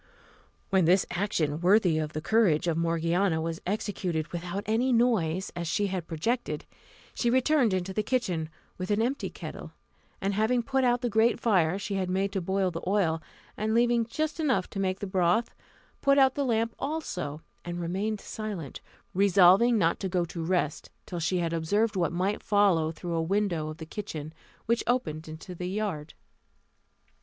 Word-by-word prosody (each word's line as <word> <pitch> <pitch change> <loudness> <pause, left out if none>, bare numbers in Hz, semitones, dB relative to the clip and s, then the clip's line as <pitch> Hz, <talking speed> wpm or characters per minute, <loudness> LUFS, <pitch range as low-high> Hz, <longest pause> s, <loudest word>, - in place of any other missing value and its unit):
When 190 -3 +4
this 180 +3 +4
action, 165 -6 -1
worthy 180 -3 +4
of 155 -1 -3
the 155 - -3
courage 190 -6 +3
of 165 - +1
Morgiana, 165 +2 +1
was 160 0 -3
executed 185 -5 -2
without 175 +3 -4
any 230 +5 +1
noise, 200 -8 +2
as 170 -1 -3
she 205 +5 +1
had 175 -3 -3
projected, 225 +10 -2 0.5
she 240 - 0
returned 260 -1 +3
into 185 0 -2
the 215 - 0
kitchen 190 -10 -1 0.3
with 185 - -4
the 205 0 +2
empty 250 +5 -1
kettle; - - -8 0.5
and 195 +1 -1
having 225 +4 +1
put 265 +2 0
out 245 -1 +2
the 245 - 0
great 220 +3 +3
fire 185 -6 +2
she 200 0 -4
had 185 -1 -1
made 190 +2 0
to 195 - -2
boil 190 +1 0
the 165 - -5
oil, 180 -5 +1 0.3
and 220 +1 -1
leaving 235 -1 +3
just 310 +7 -2
enough 260 - +1
to 195 - -5
make 190 0 -1
the - - -2
broth, 185 +3 +1 0.5
put 275 0 +4
out 265 -2 +5
the 285 0 -1
lamp 230 -2 +1
also, 180 - -4 0.2
and 175 0 -5
remained 195 +5 -2
silent, 200 -12 -6 0.3
resolving 195 +4 +5
not 170 -4 +2
to 190 - -3
go 175 -1 +1
to 165 0 -6
rest 165 -3 -1 0.2
till 175 - -5
she 170 +3 0
had 170 -1 -1
observed 205 +7 +1
what 170 -4 +1
might 185 +5 -1
follow 190 -6 +3
through 170 +1 -5
a 165 - +1
window 175 -3 0
of 155 - -7
the 160 - -7
kitchen, 155 -4 -6 0.3
which 235 +1 +1
opened 160 -11 -1
into 155 +3 -8
the 180 +1 -4
yard. 190 -7 -3
190 Hz, 180 wpm, -28 LUFS, 170-220 Hz, 0.5 s, out